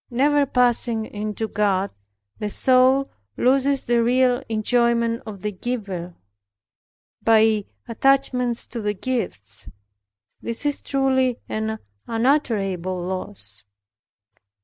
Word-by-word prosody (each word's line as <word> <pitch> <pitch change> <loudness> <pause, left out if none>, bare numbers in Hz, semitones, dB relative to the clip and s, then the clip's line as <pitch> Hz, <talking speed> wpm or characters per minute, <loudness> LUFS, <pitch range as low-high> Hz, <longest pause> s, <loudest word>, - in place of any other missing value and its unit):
Never 285 +3 +2
passing 240 -3 +2
into 215 +1 -4
God 200 -2 0 0.5
the 210 - -2
soul 260 +4 +3 0.3
loses 270 +2 +2
the 240 0 +2
real 250 +1 +3
enjoyment 235 +1 +1
of 200 -3 -8
the 210 - -2
Giver, 190 -5 -5 1.1
by 220 -2 +4 0.2
attachments 250 -1 +1
to 235 - -5
the 210 0 -1
gifts. 180 - -4 0.7
This 230 +5 -3
is 290 -1 0
truly 260 -2 +1
an 220 0 -2 0.3
unutterable 215 - 0
loss. 175 - -6
230 Hz, 100 wpm, -23 LUFS, 205-255 Hz, 1.1 s, by